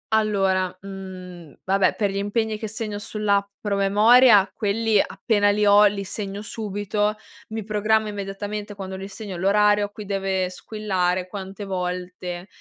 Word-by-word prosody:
Allora, 195 -4 +1
mhmm, 185 -5 -9
vabbè 190 0 +2
per 205 -2 0
gli 195 - -4
impegni 215 +2 -1
che 220 - -4
segno 210 -1 -5
sull'app 205 -2 0
Promemoria 205 +2 +5
quelli 215 0 +2
appena 205 -3 +1
li 210 +1 +2
ho, 205 +1 +7
li 200 -1 +1
segno 200 +1 -5
subito, 210 0 -2 0.3
mi 220 0 -4
programma 215 +1 +1
immediatamente 205 +1 -5
quando 190 -1 -6
li 190 +1 -6
segno 200 -2 -7
l'orario 205 +2 +3
a - - -8
cui 210 0 -9
deve 190 -2 -1
squillare, 185 -3 -2
quante 195 +1 -7
volte, 180 -1 -4
200 Hz, 145 wpm, -23 LUFS, 190-210 Hz, 0.3 s, ho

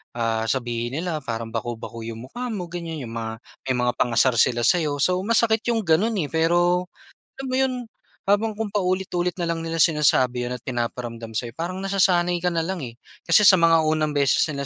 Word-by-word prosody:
ah, 115 -1 -1
sabihin 120 -1 -2
nila 165 -1 -2
parang 115 0 -4
baku-baku 115 0 -5
yung 115 - -9
mukha 250 - -5
mo, 180 -4 -5
ganyan. 165 -3 -5
Yung 115 - -8
mga 115 0 -5 0.3
may 130 - +1
mga 125 - +2
pang-asar 120 +1 +3
sila 120 -1 +3
sa'yo. 150 +2 +2
So, 180 0 +2
masakit 225 0 +2
yung 225 - 0
gano'n 195 +7 +2
eh. 145 - -5
Pero, 175 +2 +2 0.5
alam 270 - -5
mo 255 0 -1
'yon, 260 -1 +1 0.5
habang 215 +2 +2
kung 220 0 -4
paulit-ulit 185 -3 -1
na 170 - -1
lang 165 -1 -2
nila 165 0 -2
sinasabi 130 -6 +3
'yon 120 - -4
at - - -15
pinaparamdam 120 -2 -4
sa'yo, 120 +2 -2
parang 180 +3 -4
nasasanay 185 -3 +2
ka - - +3
na 165 - 0
lang 185 +1 -3
eh. 115 - -7 0.3
Kasi - - +5
sa 185 - +9
mga 165 -1 +4
unang 155 -1 +1
beses 140 -3 +3
nila 140 -2 -4
165 Hz, 195 wpm, -23 LUFS, 120-180 Hz, 0.5 s, sa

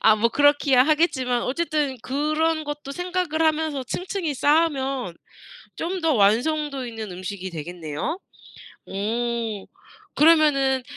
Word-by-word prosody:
아 220 - +6
뭐 225 +2 +2
그렇기야 290 -1 +4
하겠지만 265 -6 +1
어쨌든 295 -1 -1
그런 310 +3 0
것도 295 -1 -6
생각을 355 -2 -2
하면서 315 -3 +1
층층이 355 +3 -3
쌓으면 275 - +1 0.6
좀 365 +3 -3
더 325 - +3
완성도 265 +5 +1
있는 225 -4 -6
음식이 185 +1 -6
되겠네요. 165 - -5 0.7
어. 225 +1 -2 0.5
그러면은 290 -4 +4
275 Hz, 265 characters per minute, -23 LUFS, 235-315 Hz, 0.7 s, 아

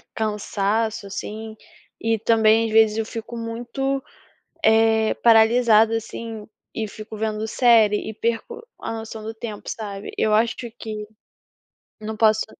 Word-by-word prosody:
cansaço, 215 0 -1
assim, 215 +2 -6 0.5
e 225 0 +1
também, 225 0 +4
às 225 - -3
vezes, 220 -1 +4
eu 225 - 0
fico 230 +1 -7
muito, 245 +4 -3 0.6
eh, 220 -1 +4
paralisada, 225 -1 +5
assim, 225 -1 -7 0.3
e 220 -1 -3
fico 215 +1 -9
vendo 215 0 -2
série 220 -3 +4
e - - -6
perco 235 - -3
a - - -4
noção 225 0 -7
do 220 +1 -5
tempo, 220 -2 -7
sabe, 205 -2 -6
eu 215 - +2
acho 225 +2 +3 0.2
que 215 -1 -5 0.9
não 220 +1 -5
posso 220 0 +3
220 Hz, 135 wpm, -22 LUFS, 215-230 Hz, 0.9 s, paralisada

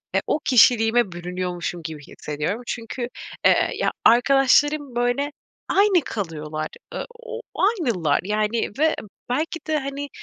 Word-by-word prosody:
e, - - +3
o - - +1
kişiliğime 235 -3 +5
bürünüyormuşum 175 0 -4
gibi 155 -2 -6
hissediyorum. 150 +9 -4
Çünkü, 240 +1 -4 0.4
eee, - - +4
ya - - 0
arkadaşlarım 270 +3 +4
böyle 245 +4 0 0.4
aynı 395 -3 +4
kalıyorlar. 155 -5 -4 0.3
Iıı, - - -4
o 485 0 -9
ııı, 470 - -5 0.5
aynılar 165 -11 +2
yani 215 +3 0
ve 315 +1 +3 0.3
belki 310 +6 -1
de, 310 0 +1
hani, 280 +1 -5
240 Hz, 130 wpm, -23 LUFS, 180-285 Hz, 0.5 s, kişiliğime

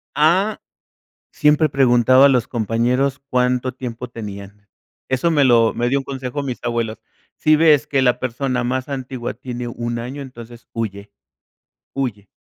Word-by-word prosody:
¡Ah! 185 +8 +2 0.7
Siempre 150 0 +3
preguntaba 130 0 +5
a - - +6
los 125 -2 +2
compañeros 125 +4 0
cuánto 125 0 +1
tiempo 125 -1 -6
tenían. 100 -2 -9 0.4
Eso 130 +6 +1
me 145 -3 +3
lo 115 -2 +4
me 120 +1 -1
dio 140 +2 +2
un - - -6
consejo 135 +1 -5
mis 130 -3 -4
abuelos. 115 -2 -2 0.4
Si 155 0 +3
ves 150 -2 +4
que 135 -2 +1
la 125 -2 +2
persona 130 0 -2
más 130 +2 -2
antigua 130 -3 -4
tiene 125 -1 -6
1 120 0 -4
año, 130 +4 -6
entonces 120 -3 -11
huye, 100 -3 -5 0.8
huye. 110 -7 -4
125 Hz, 150 wpm, -20 LUFS, 120-135 Hz, 0.8 s, a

